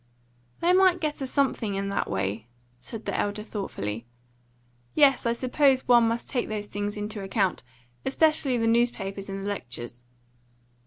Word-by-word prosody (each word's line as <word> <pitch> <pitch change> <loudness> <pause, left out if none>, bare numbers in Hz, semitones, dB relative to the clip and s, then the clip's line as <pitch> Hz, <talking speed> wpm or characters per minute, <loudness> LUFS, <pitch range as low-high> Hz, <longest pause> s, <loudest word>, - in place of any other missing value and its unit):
"They 350 +2 +4
might 370 -1 +5
get 305 -3 -2
a 270 - -2
something 255 -7 0
in 195 0 -2
that 200 - -1
way," 100 +3 -2 0.3
said 220 - -8
the - - -2
elder 205 +1 -1
thoughtfully. 115 - -5 0.9
"Yes, 275 -5 +5
I 235 - +2
suppose 260 +2 +2
one 240 -2 +6
must 230 +1 -2
take 245 - -1
those 210 -1 -3
things 205 0 -4
into 210 0 -3
account 195 -1 0 0.4
especially 295 -3 +2
the 225 - +1
newspapers 220 -4 0
and 195 0 -4
the - - -1
lectures. 120 -9 -5
215 Hz, 155 wpm, -27 LUFS, 195-260 Hz, 0.9 s, one